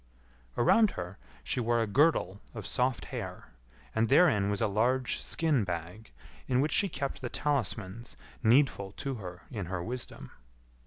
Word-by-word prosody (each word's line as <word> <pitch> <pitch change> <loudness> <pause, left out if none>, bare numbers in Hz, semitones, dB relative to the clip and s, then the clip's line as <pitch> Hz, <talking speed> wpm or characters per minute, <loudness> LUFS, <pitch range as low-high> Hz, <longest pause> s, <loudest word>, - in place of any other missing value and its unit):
Around 215 - +5
her 90 +1 -6 0.2
she - - -1
wore 120 0 +2
a 115 - +2
girdle 105 - +2
of 110 - -6
soft 125 0 0
hair, - - -6 0.4
and 110 0 +1
therein 120 - +5
was 100 -1 -1
a - - +2
large 120 +5 +1
skin 155 -8 +1
bag, 90 +4 -5 0.4
in 125 -1 +2
which 150 +3 +2
she 200 +6 +3
kept 140 -4 -4
the 125 - -3
talismans 120 -6 -2 0.2
needful 110 -5 +3
to 135 +5 -4
her 90 -1 -8
in 100 -8 -4
her 90 -1 -3
wisdom. 125 +5 -6
115 Hz, 155 wpm, -30 LUFS, 100-135 Hz, 0.4 s, Around